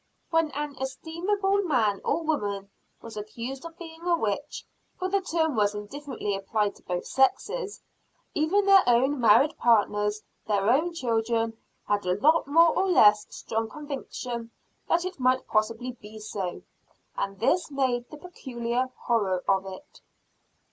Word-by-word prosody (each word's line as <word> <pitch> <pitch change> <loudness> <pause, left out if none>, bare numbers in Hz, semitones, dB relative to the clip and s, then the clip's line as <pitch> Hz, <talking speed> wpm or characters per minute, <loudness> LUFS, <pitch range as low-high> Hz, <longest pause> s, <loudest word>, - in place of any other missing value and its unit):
When 325 -1 +3
an 295 0 -4
estimable 385 +8 -1
man 235 - +1
or 325 +3 0
woman 205 -10 -2 0.3
was 230 -1 -9
accused 235 +5 -6
of 330 0 -9
being 325 -1 -10
a 345 -1 +2
witch, 225 +4 -3 0.3
for 370 - -2
the 395 +1 +1
term 320 -5 0
was 205 -1 +2
indifferently 210 -1 -4
applied 200 +1 -1
to - - -21
both 180 0 -3
sexes, 415 - 0 0.5
even 345 +7 +2
their 395 -1 +7
own 260 +4 +3
married 235 +7 +5
partners, 210 -2 +2 0.2
their 200 -2 +1
own 325 +6 +1
children, 230 -4 0 0.3
had 205 0 +1
a 180 +2 +1
more 320 +3 +4
or 385 - +2
less 210 - +5
strong 225 0 -3
conviction 255 -4 -6 0.4
that 345 +1 +2
it 370 -5 -5
might 255 0 +2
possibly 225 +3 0
be 220 -3 -13
so. 200 -4 -5 0.5
And 195 -1 -3
this 320 +10 +2
made 255 -4 -1
the 300 - -10
peculiar 255 -7 -3
horror 200 -7 +1
of 195 0 +2
it. 190 -1 -11
250 Hz, 145 wpm, -27 LUFS, 210-320 Hz, 0.5 s, their